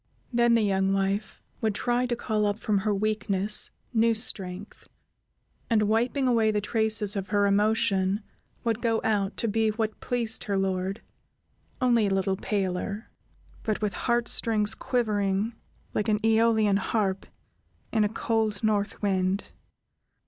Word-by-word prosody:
Then 235 0 +4
the 230 - +3
young 195 -1 +1
wife 195 +2 -2 0.2
would 220 -2 0
try 245 +2 0
to 240 - -1
call 215 -3 -1
up 205 0 -1
from 210 -2 0
her 210 +2 -1
weakness 210 -1 +1 0.2
new 230 0 +3
strength, 195 -3 -1 0.8
and 220 -2 +3
wiping 240 +6 +1
away 230 -3 +3
the 210 -1 +1
traces 215 0 +1
of 195 -1 -3
her 205 -1 +2
emotion, 200 -1 +2 0.4
would 230 -1 -1
go 230 -2 +1
out 205 -2 0
to 230 - 0
be 220 +1 +1
what 215 0 -3
pleased 235 -3 -1
her 200 -2 -1
lord, 190 +1 -2 0.8
only 240 -5 +3
a 195 - 0
little 190 0 0
paler, 200 +2 -3 0.5
but 215 -2 -2
with 205 -2 0
heart 240 +3 0
strings 215 -2 +3
quivering 210 -3 -1 0.4
like 210 +1 -1
an 210 - +3
Æolian 220 -2 +3
harp 195 -2 -1 0.6
in 220 -2 +2
a 210 - +1
cold 220 -2 -1
north 210 -1 0
wind. 190 0 0
215 Hz, 145 wpm, -26 LUFS, 200-225 Hz, 0.8 s, Then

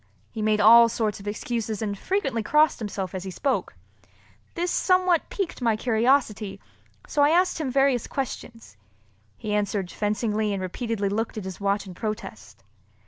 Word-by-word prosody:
He 220 - -5
made 215 0 +2
all 230 +2 +8
sorts 220 -3 -2
of 200 - -11
excuses 220 0 -3
and 205 -2 -2
frequently 270 - -1
crossed 300 +8 +3
himself 200 -4 -4
as 185 -1 -4
he 190 - -5
spoke. 265 +8 -2 0.8
This 350 +1 -1
somewhat 365 -2 +2
piqued 385 -9 -4
my 230 -3 +2
curiosity, 225 -2 +1 0.5
so 290 - 0
I 290 - +6
asked 355 +2 +2
him 285 - -2
various 270 -2 +2
questions. 230 - -6 0.6
He 210 - -4
answered 205 -3 -1
fencingly 210 0 -1
and 195 - -2
repeatedly 205 +1 -2
looked 220 +3 -2
at 210 - -5
his 190 0 -7
watch 200 +1 0
in 185 - -9
protest. 195 - -6
220 Hz, 160 wpm, -25 LUFS, 205-260 Hz, 0.8 s, all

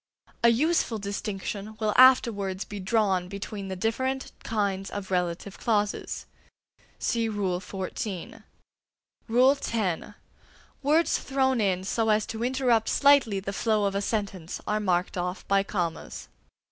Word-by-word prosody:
A 235 - +8
useful 255 -1 +2
distinction 205 +1 -5
will 215 -1 +1
afterwards 215 -7 +5
be 205 - -7
drawn 190 -2 +1
between 200 +1 -6
the 190 - -4
different 260 +7 -1
kinds 200 -3 -1
of 195 -2 -6
relative 180 +2 -2
clauses. 210 -3 -1 0.9
(Rule 205 -6 0
XIV.) 190 0 -5 0.9
X. 235 - +2 0.7
Words 305 +4 +3
thrown 265 -3 +1
in 185 -2 +1
so 220 +3 0
as 215 0 +3
to 225 +1 -5
interrupt 245 -3 +2
slightly 280 -8 +4
the 195 +1 -5
flow 215 0 +1
of 200 - 0
a 200 - -1
sentence 200 -5 -3
are 210 0 0
marked 185 -2 0
off 180 +2 -4
by 195 0 +4
commas. 175 -5 -4
205 Hz, 125 wpm, -27 LUFS, 190-230 Hz, 0.9 s, A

